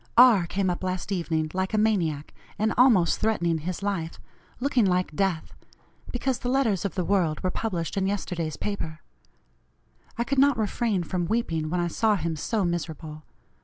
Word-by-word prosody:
R. 230 Hz, -8 st, +7 dB
came 190 Hz, +1 st, 0 dB
up 175 Hz, -, -5 dB
last 185 Hz, +2 st, -3 dB
evening 160 Hz, -4 st, -1 dB
like 190 Hz, +3 st, -1 dB
a -, -, +2 dB
maniac, 175 Hz, -9 st, 0 dB, 0.2 s
and 220 Hz, +1 st, +1 dB
almost 225 Hz, -10 st, +4 dB
threatening 170 Hz, -7 st, +1 dB
his 180 Hz, +5 st, -5 dB
life, 180 Hz, -5 st, -3 dB, 0.4 s
looking 255 Hz, -2 st, +2 dB
like 180 Hz, -4 st, +1 dB
death, 190 Hz, -4 st, -1 dB, 0.6 s
because 255 Hz, 0 st, -1 dB
the 245 Hz, -, -3 dB
letters 240 Hz, -8 st, +1 dB
of 200 Hz, -, -3 dB
the 180 Hz, -3 st, -1 dB
World 170 Hz, -6 st, +1 dB
were 185 Hz, -, 0 dB
published 180 Hz, -7 st, -3 dB
in 195 Hz, -1 st, +1 dB
yesterday's 170 Hz, -6 st, -3 dB
paper. 160 Hz, -7 st, -4 dB, 1.2 s
I 235 Hz, -, +1 dB
could 275 Hz, +2 st, 0 dB
not 280 Hz, -2 st, +5 dB
refrain 215 Hz, -3 st, 0 dB
from 175 Hz, 0 st, -2 dB
weeping 165 Hz, -8 st, -1 dB
when 180 Hz, +2 st, -1 dB
I 175 Hz, -, +1 dB
saw 215 Hz, +5 st, +2 dB
him 165 Hz, -3 st, -2 dB
so 200 Hz, +6 st, -1 dB
miserable. 160 Hz, -3 st, -4 dB
185 Hz, 170 wpm, -26 LUFS, 165-220 Hz, 1.2 s, R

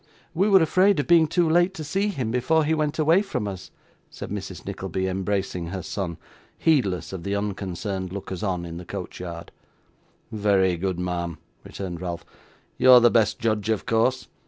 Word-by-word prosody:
'We 190 Hz, +5 st, +2 dB
were 190 Hz, -3 st, +6 dB
afraid 185 Hz, +2 st, +3 dB
of 145 Hz, -, 0 dB
being 170 Hz, -2 st, +5 dB
too 170 Hz, +2 st, +2 dB
late 175 Hz, +4 st, +3 dB
to 155 Hz, -, -5 dB
see 195 Hz, +7 st, 0 dB
him 130 Hz, -, -2 dB
before 140 Hz, +7 st, +2 dB
he 160 Hz, -, +1 dB
went 155 Hz, -2 st, -1 dB
away 160 Hz, +4 st, +4 dB
from 195 Hz, -, -3 dB
us,' 95 Hz, -2 st, -7 dB, 0.4 s
said -, -, -8 dB
Mrs. -, -, -6 dB
Nickleby, 95 Hz, 0 st, -3 dB
embracing 95 Hz, -2 st, -2 dB
her 95 Hz, +1 st, -5 dB
son, 90 Hz, -5 st, -4 dB, 0.4 s
heedless 110 Hz, -, +1 dB
of 95 Hz, -, -5 dB
the 100 Hz, +3 st, -2 dB
unconcerned 95 Hz, -1 st, -3 dB
lookers 95 Hz, -2 st, -6 dB
on 90 Hz, -4 st, -2 dB
in 85 Hz, 0 st, -7 dB
the 90 Hz, -, -7 dB
coach 95 Hz, 0 st, -7 dB
yard. 85 Hz, -2 st, -7 dB, 0.8 s
'Very 100 Hz, -4 st, +2 dB
good, 95 Hz, 0 st, -2 dB
ma'am,' 85 Hz, -2 st, -3 dB, 0.3 s
returned 90 Hz, -3 st, -6 dB
Ralph, 85 Hz, -2 st, -5 dB, 0.5 s
'you're 130 Hz, -1 st, +8 dB
the 120 Hz, 0 st, +5 dB
best 110 Hz, -3 st, +2 dB
judge 110 Hz, -3 st, -1 dB
of 110 Hz, -2 st, 0 dB
course. 125 Hz, +3 st, +1 dB
105 Hz, 180 wpm, -24 LUFS, 95-150 Hz, 0.8 s, you're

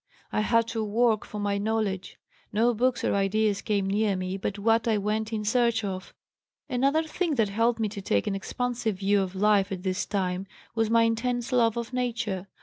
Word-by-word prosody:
I -, -, +1 dB
had 230 Hz, +1 st, +2 dB
to 225 Hz, -1 st, -2 dB
work 220 Hz, +1 st, +2 dB
for 210 Hz, -, -8 dB
my 205 Hz, -1 st, 0 dB
knowledge. 205 Hz, -3 st, -2 dB, 0.3 s
No 230 Hz, +3 st, +3 dB
books 250 Hz, +2 st, +1 dB
or -, -, +1 dB
ideas 200 Hz, +1 st, +1 dB
came 200 Hz, -3 st, 0 dB
near 205 Hz, 0 st, +1 dB
me 185 Hz, 0 st, -3 dB
but 195 Hz, +1 st, -3 dB
what 225 Hz, +2 st, +2 dB
I 220 Hz, -2 st, +3 dB
went 215 Hz, +2 st, -1 dB
in 215 Hz, -1 st, -2 dB
search 235 Hz, 0 st, +2 dB
of. 190 Hz, -2 st, -5 dB, 0.6 s
Another 275 Hz, +5 st, +2 dB
thing 320 Hz, 0 st, -1 dB
that 225 Hz, -5 st, +2 dB
helped 230 Hz, +3 st, +1 dB
me 220 Hz, -, +1 dB
to 200 Hz, -1 st, -7 dB
take 100 Hz, -, +1 dB
an 205 Hz, -, -1 dB
expansive 235 Hz, +2 st, -2 dB
view 200 Hz, +1 st, +2 dB
of 190 Hz, 0 st, -4 dB
life 200 Hz, 0 st, +3 dB
at 185 Hz, -2 st, -4 dB
this 185 Hz, 0 st, -1 dB
time 190 Hz, -1 st, -2 dB, 0.3 s
was 225 Hz, -1 st, +1 dB
my 230 Hz, 0 st, +5 dB
intense 235 Hz, +2 st, 0 dB
love 235 Hz, -3 st, +3 dB
of 235 Hz, +1 st, -4 dB
Nature. 230 Hz, -6 st, -2 dB
215 Hz, 200 wpm, -27 LUFS, 200-230 Hz, 0.6 s, my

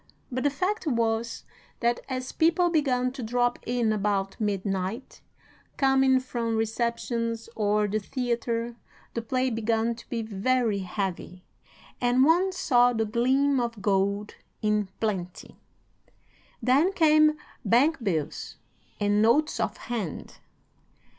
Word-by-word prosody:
But 255 Hz, +1 st, -2 dB
the 285 Hz, -, +4 dB
fact 370 Hz, +6 st, -2 dB
was, 230 Hz, -3 st, 0 dB, 0.4 s
that 235 Hz, 0 st, +1 dB
as 255 Hz, 0 st, -3 dB
people 340 Hz, +2 st, +2 dB
began 255 Hz, -6 st, +1 dB
to 260 Hz, 0 st, -8 dB
drop 245 Hz, +1 st, 0 dB
in 235 Hz, -2 st, +1 dB
about 200 Hz, -2 st, -1 dB
midnight, 200 Hz, +2 st, -3 dB, 0.6 s
coming 270 Hz, -1 st, +4 dB
from 235 Hz, -3 st, -3 dB
receptions 230 Hz, +1 st, -2 dB
or 210 Hz, -1 st, +1 dB
the 210 Hz, +2 st, -1 dB
theatre, 235 Hz, 0 st, -2 dB, 0.4 s
the 230 Hz, -, -2 dB
play 255 Hz, +3 st, 0 dB
began 225 Hz, +1 st, 0 dB
to 230 Hz, -, -14 dB
be 230 Hz, -2 st, -2 dB
very 220 Hz, +1 st, 0 dB
heavy, 185 Hz, -1 st, -4 dB, 0.6 s
and 245 Hz, +1 st, +4 dB
one 355 Hz, +5 st, +4 dB
saw 245 Hz, -9 st, +3 dB
the 225 Hz, -1 st, 0 dB
gleam 260 Hz, +5 st, +2 dB
of 235 Hz, -2 st, -3 dB
gold 200 Hz, +1 st, 0 dB, 0.3 s
in 210 Hz, -2 st, +1 dB
plenty. 190 Hz, -5 st, -4 dB, 1.0 s
Then 280 Hz, +9 st, +4 dB
came 310 Hz, -3 st, +4 dB, 0.3 s
bank 250 Hz, +7 st, +3 dB
bills 160 Hz, -8 st, -2 dB, 0.4 s
and 205 Hz, 0 st, +2 dB
notes 265 Hz, +8 st, +3 dB
of -, -, -1 dB
hand. 220 Hz, -, -5 dB
235 Hz, 120 wpm, -27 LUFS, 210-260 Hz, 1.0 s, the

